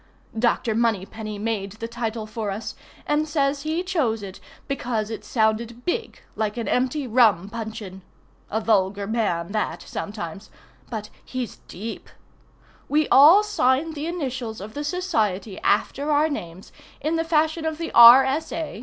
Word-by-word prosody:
Dr. 235 -1 +1
Moneypenny 215 -1 -1
made 205 -2 -3
the 225 +2 -6
title 230 -1 -4
for 215 -1 -4
us, 200 +3 -5 0.3
and 300 +1 +1
says 280 -2 0
he 315 +4 -2
chose 270 - 0
it 190 -1 -8 0.3
because 235 -6 -2
it 215 -2 -6
sounded 225 +2 -1
big 455 +6 -3
like 215 0 -2
an 230 - -3
empty 260 +3 0
rum 220 -7 +4
puncheon. 215 -4 -7 0.5
(A 220 - 0
vulgar 200 -2 +1
man 200 -6 -1
that 215 0 -2
sometimes—but 205 +4 -8
he's 255 -4 -5
deep.) 220 +5 -7 0.8
We 300 +1 +2
all 320 +10 +8
sign 320 -6 +1
the 305 +1 -4
initials 260 -9 -4
of 210 +3 -8
the 290 - -4
society 220 - -1
after 275 +7 +1
our 300 +2 +3
names, 180 - -7 0.3
in 310 +3 -1
the 325 - +1
fashion 320 0 +1
of 315 -1 -2
the 330 0 -4
R. 240 +3 +10
S. 280 +4 -2
A. 320 -9 -4
230 Hz, 150 wpm, -24 LUFS, 215-295 Hz, 0.8 s, R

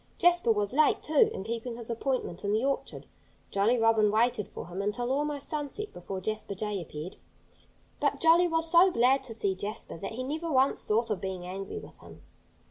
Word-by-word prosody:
Jasper 350 -8 +4
was 210 -1 0
late, 305 +2 +3
too, 305 -2 +4
in - - -5
keeping 230 +2 -4
his 235 0 -6
appointment 235 -7 -2
in 200 0 0
the 220 +4 +1
orchard. 275 0 -3 0.5
Jolly 210 +5 +2
Robin 225 -2 +4
waited 225 0 +1
for - - -8
him 180 +2 -5
until 240 +5 -2
almost 290 0 -1
sunset 305 +8 -4
before 190 +2 -6
Jasper 215 +1 -4
Jay 210 -1 -3
appeared. 155 +2 -8 0.8
But - - 0
Jolly 335 +2 +6
was 325 -1 +1
so 345 +3 +7
glad 265 -3 +3
to 235 - -6
see 200 -3 0
Jasper 200 -3 -5
that 195 - -5
he 255 +3 -4
never 315 +5 -3
once 265 0 +2
thought 225 +2 +1
of 205 - -2
being 190 -2 -4
angry 195 - -6
with 430 - -11
him. - - -14
230 Hz, 195 wpm, -29 LUFS, 200-285 Hz, 0.8 s, so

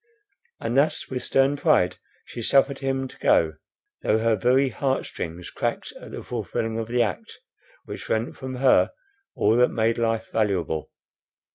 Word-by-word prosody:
And 120 - -2
thus 140 +3 +2
with 125 -1 -2
stern 135 +1 +2
pride 90 -10 +3 0.3
she 120 - -7
suffered 135 +3 +3
him 135 -1 -1
to - - -16
go, 80 -1 +3 0.5
though 110 - +2
her 115 0 +2
very 130 +6 +3
heart 135 +2 -1
strings 85 +1 -6
cracked - - -3
at - - -10
the - - -7
fulfilling 115 0 -3
of 110 - -3
the 120 0 +2
act, 105 -5 -5 0.5
which - - -8
rent 110 +2 -1
from 130 -1 -6
her 130 0 +4 0.4
all 110 +2 +3
that 125 0 +5
made 115 0 0
life 115 -1 0
valuable. 95 -8 -1
115 Hz, 160 wpm, -24 LUFS, 110-135 Hz, 0.5 s, that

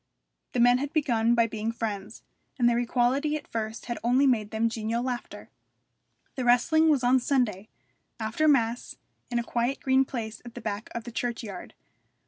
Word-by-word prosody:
The 250 - 0
men 245 +1 +5
had 285 +2 -4
begun 240 -7 +2
by 230 -1 +4
being 220 0 -3
friends, 215 -2 -5 0.3
and 240 -2 +3
their 240 0 +3
equality 255 +5 +1
at 305 - -6
first 220 0 -4
had 240 -1 -4
only 250 +4 +3
made 225 -6 +2
them 220 +1 0
genial 230 +1 -2
laughter. 250 -2 -5 0.8
The 255 - -3
wrestling 315 +7 +4
was 285 -5 +2
on 250 +2 +4
Sunday, 235 -6 0 0.5
after 225 +8 0
mass, 240 -5 +1 0.3
in 240 - -1
a 235 - 0
quiet 240 +3 -1
green 265 0 +3
place 230 -5 -6
at 240 -1 -11
the - - -6
back 215 -1 -4
of 235 - -3
the 240 - -8
churchyard. 230 -5 -5
240 Hz, 175 wpm, -27 LUFS, 225-255 Hz, 0.8 s, men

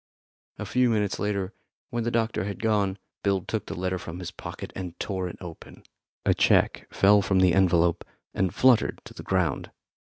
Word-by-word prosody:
A 105 - -5
few 125 +4 +2
minutes 105 -3 0
later, 100 -1 -2 0.4
when 120 -1 -1
the 120 - 0
doctor 115 -3 0
had 100 0 -5
gone, 100 -3 +1 0.2
Bill 100 -2 +1
took - - -4
the - - -5
letter 95 +1 -2
from 85 0 -7
his 90 -2 -6
pocket - - -8
and 90 -3 -6
tore 95 -3 -2
it 90 - -8
open. 85 -3 -11 0.4
A - - +4
cheque - - +2
fell 100 +1 +5
from 100 -1 +1
the 90 -2 +5
envelope 85 -2 +3 0.3
and 95 -2 0
fluttered 125 0 +3
to - - -11
the - - -9
ground. 90 -7 0
95 Hz, 185 wpm, -26 LUFS, 90-105 Hz, 0.4 s, fell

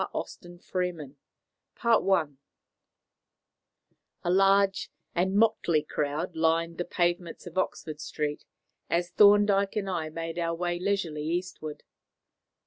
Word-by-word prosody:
V - - +1
THE 175 - -6
MOABITE 175 -4 -4 0.7
CIPHER 190 -10 +3 1.9
A 175 - +1
large 195 +1 +3 0.2
and 185 +2 +1
motley 200 -8 +3
crowd 155 +4 -3
lined 165 +1 +1
the 175 - -1
pavements 175 -1 -1
of 175 -1 -10
Oxford 155 -4 -3
Street 150 -1 -3 0.5
as 175 +1 0
Thorndyke 205 0 +5
and 205 -2 -1
I 170 -4 -2
made 165 +1 -5
our 165 0 -1
way 175 0 -2
leisurely 175 -6 -1
eastward. 170 -2 -4
175 Hz, 115 wpm, -28 LUFS, 160-195 Hz, 1.9 s, Thorndyke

